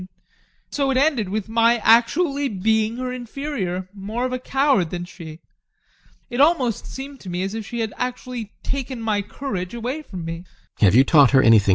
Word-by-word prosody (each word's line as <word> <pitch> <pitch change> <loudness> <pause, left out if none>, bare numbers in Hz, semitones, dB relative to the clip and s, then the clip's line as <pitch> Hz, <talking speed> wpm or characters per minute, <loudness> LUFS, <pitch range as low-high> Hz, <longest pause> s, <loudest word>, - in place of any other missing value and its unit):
And 185 - -9 0.6
so 275 -2 0
it 265 - +1
ended 265 -8 +2
with 210 +1 -3
my 230 +1 +3
actually 275 +6 +3
being 220 +3 0
her 255 0 -3
inferior, 240 -8 -4
more 210 +5 -4
of 255 - -3
a 255 - -2
coward 265 - +1
than 175 0 -4
she. 165 -2 -11 0.9
It 240 +2 -1
almost 280 -8 +2
seemed 275 +1 -8
to 190 - -9
me 180 +1 -2
as 195 +1 -3
if 220 -2 -5
she 235 -1 -3
had 220 -1 -3
actually 250 -3 -4
taken 265 -2 -3
my 215 -2 0
courage 200 -3 -5
away 250 +6 -3
from 185 - -8
me. 165 +2 -6
230 Hz, 165 wpm, -22 LUFS, 195-265 Hz, 0.9 s, my